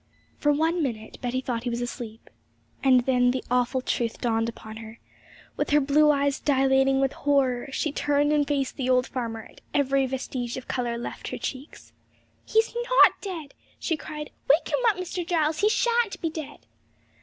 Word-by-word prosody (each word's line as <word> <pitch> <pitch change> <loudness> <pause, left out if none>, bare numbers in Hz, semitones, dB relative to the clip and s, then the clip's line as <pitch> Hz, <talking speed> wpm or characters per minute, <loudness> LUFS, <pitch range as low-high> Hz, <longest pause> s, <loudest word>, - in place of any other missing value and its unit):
For 295 - +3
one 325 +4 +1
minute 225 -6 -4
Betty 250 +1 -1
thought 245 -3 -3
he - - 0
was 235 0 -2
asleep, 240 -2 -7 0.5
and 260 -2 +6
then 250 0 +3
the 255 +1 -1
awful 250 +1 +1
truth 235 -2 -2
dawned 225 -1 0
upon 220 -1 -10
her. 225 0 -10 0.6
With - - -1
her 295 - +5
blue 295 +2 +4
eyes 285 -1 +2
dilating 270 -1 +3
with 270 0 +1
horror, 275 -3 +1
she 305 +2 -1
turned 290 +1 +1
and 295 -1 +2
faced 275 -3 -1
the 260 -2 -1
old 255 0 +4
farmer, 230 -4 -4
and - - -17
every 275 -1 +2
vestige 255 -2 -4
of 260 - -8
colour 240 -2 -2
left 240 - -6
her - - -4
cheeks. 270 +3 -7 0.5
'He's 445 +1 +2
not 480 +1 +4
dead!' 335 -8 -6 0.2
she 330 - -1
cried. 300 0 -7 0.2
'Wake 300 +5 +4
him - - +1
up, 425 -4 +3
Mr. 365 0 -4
Giles; 320 -2 0
he 420 - +4
shan't 470 -2 +1
be 330 - -2
dead!' 310 -3 -8
270 Hz, 180 wpm, -26 LUFS, 245-300 Hz, 0.6 s, and